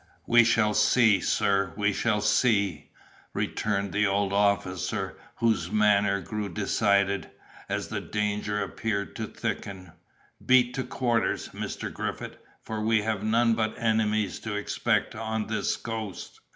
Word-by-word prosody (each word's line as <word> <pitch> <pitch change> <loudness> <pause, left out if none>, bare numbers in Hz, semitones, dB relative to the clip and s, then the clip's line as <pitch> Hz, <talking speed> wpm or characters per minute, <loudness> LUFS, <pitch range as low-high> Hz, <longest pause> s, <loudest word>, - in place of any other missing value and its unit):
"We 120 0 +6
shall 115 -2 +3
see, 105 -1 +4
sir, 100 -2 +1
we 105 -1 +1
shall 105 0 0
see," 105 - +1 0.4
returned 100 -2 -1
the 105 0 +2
old 100 0 0
officer, 95 -2 0 0.2
whose 110 -7 +1
manner 105 -1 +3
grew 105 0 -4
decided, 100 +1 +1 0.4
as - - -2
the - - -3
danger 105 0 -2
appeared 100 -3 -3
to 110 -1 -3
thicken; 95 -4 -5 0.5
"beat 125 -1 +4
to 130 - -2
quarters, 120 -2 -1
Mr. - - -5
Griffith, - - -5 0.3
for 110 -1 -4
we 110 0 +2
have 110 -2 -1
none 115 +2 +3
but 110 -1 -1
enemies 110 -3 0
to 110 -2 -4
expect 105 - 0
on 110 0 -3
this 110 - -1
coast." 110 -4 -6
105 Hz, 135 wpm, -27 LUFS, 100-110 Hz, 0.5 s, We